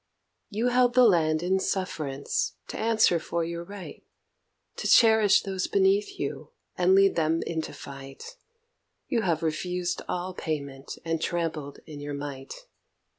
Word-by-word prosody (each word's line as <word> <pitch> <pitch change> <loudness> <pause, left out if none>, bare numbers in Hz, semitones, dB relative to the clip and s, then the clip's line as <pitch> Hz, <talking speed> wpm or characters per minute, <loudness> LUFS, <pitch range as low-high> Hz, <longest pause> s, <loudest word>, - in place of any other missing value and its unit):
You 225 +4 0
held 245 0 +3
the 255 - +7
land 160 -7 +3
in 190 +2 +2
sufferance 140 - -2
to - - -5
answer 220 -6 +3
for 170 +1 -2
your 170 0 -5
right, 200 +1 -10 0.7
To - - -2
cherish 220 -3 +6
those 190 -2 -2
beneath 400 0 +2
you - - -4 0.3
and 180 +1 +4
lead 195 0 +5
them 165 0 +1
into 160 -1 -3
fight; 140 - -10 0.7
You 235 - +1
have 165 -5 0
refused 180 +3 -2
all 180 +1 -3
payment, 140 -5 -5
and 165 -1 -1
trampled 160 -4 -3
in 150 -2 -9
your 145 0 -5
might. 140 -2 -7
175 Hz, 140 wpm, -27 LUFS, 155-205 Hz, 0.7 s, the